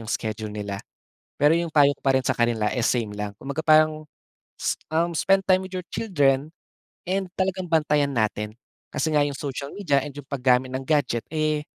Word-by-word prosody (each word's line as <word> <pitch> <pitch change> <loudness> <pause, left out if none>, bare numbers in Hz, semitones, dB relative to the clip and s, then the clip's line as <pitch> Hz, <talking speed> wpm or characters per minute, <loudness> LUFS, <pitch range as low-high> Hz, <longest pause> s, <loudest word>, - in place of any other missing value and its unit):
'yong 110 - -10
schedule 110 -1 -3
nila. 100 -1 -5 0.6
Pero 150 +3 +5
'yong 170 -1 0
payo 145 -2 +5
ko - - -37
pa 135 -1 +3
rin 130 - -4
sa - - +2
kanila 120 -3 +1
is 120 -2 +1
same 115 -4 -1
lang. 105 0 -4
Kumbaga 140 +3 -4
parang 155 0 +4 0.5
s - - -2 0.2
uhm, 170 +1 +2
spend 195 +4 +2
time 185 0 +2
with 185 - -11
your 180 - -3
children 145 -9 +1 0.6
and 190 -1 -1
talagang 190 -1 -1
bantayan 150 -4 +2
natin 110 -2 -1 0.4
kasi 160 - 0
nga 150 -2 +3
'yong 145 - -2
social 140 0 -5
media 145 -9 +1
and 145 - -7
'yong 145 -1 -11
paggamit 130 -2 +2
ng 130 +1 -4
gadget, 130 -6 +1
eh, 155 -1 0
145 Hz, 195 wpm, -24 LUFS, 125-160 Hz, 0.6 s, Pero